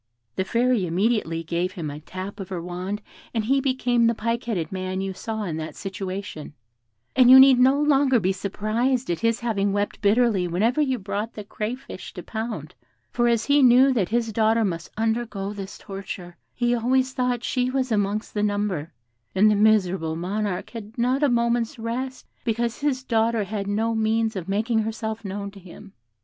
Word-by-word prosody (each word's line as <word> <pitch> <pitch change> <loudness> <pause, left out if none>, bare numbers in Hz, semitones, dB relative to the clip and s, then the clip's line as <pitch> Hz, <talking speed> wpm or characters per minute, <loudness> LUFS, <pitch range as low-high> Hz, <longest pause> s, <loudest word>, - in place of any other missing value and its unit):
The 190 - 0
Fairy 235 -2 +1
immediately 175 -2 0
gave 175 +3 -2
him 160 -5 -4
a 145 - -7
tap 185 +6 -7
of 195 - -6
her 185 -2 -3
wand, 180 +4 -5 0.3
and 220 -2 0
he 270 +3 +2
became 245 -3 +2
the 230 - +2
pike 230 +2 -2
headed 205 -7 -2
man 185 0 -3
you 195 0 -3
saw 220 +3 -4
in 165 -5 -3
that 160 0 -6
situation; 190 -5 -6 0.6
and 255 -1 +6
you 260 +1 +11
need 265 -1 +8
no 265 +3 +5
longer 280 -4 +4
be 190 -1 +1
surprised 215 +5 -1
at 170 - -2
his 230 0 +1
having 205 -4 0
wept 205 0 -2
bitterly 205 -3 +3
whenever 220 - +1
you 265 -3 +1
brought 205 +2 -4
the 210 - -6
crayfish 215 0 -6
to 180 - -7
pound, 225 0 -5 0.4
for 240 0 +2
as 235 -1 +2
he 285 0 +4
knew 260 +1 +6
that 205 -8 0
his 230 -1 0
daughter 225 +1 +3
must 170 -3 -3
undergo 220 -3 -1
this 195 -2 -7
torture, 190 -3 -8 0.2
he 240 0 +1
always 255 +2 +1
thought 250 -2 -1
she 250 0 0
was 260 -1 -1
amongst 205 0 0
the 210 - -1
number; 205 -6 -1 0.4
and 210 +3 +5
the - - +3
miserable 190 -6 +2
Monarch 190 +3 -3
had 225 -1 -9
not 250 +4 +1
a 290 - +4
moment's 235 -1 +1
rest, 250 +3 -4 0.2
because 235 0 -1
his 275 -3 0
daughter 225 -2 +1
had 200 0 -4
no 220 +3 0
means 220 0 +1
of 185 -1 -5
making 220 +3 +1
herself 220 0 -3
known 200 0 -5
to 200 - -13
him. 195 +2 -13
220 Hz, 185 wpm, -24 LUFS, 195-240 Hz, 0.6 s, you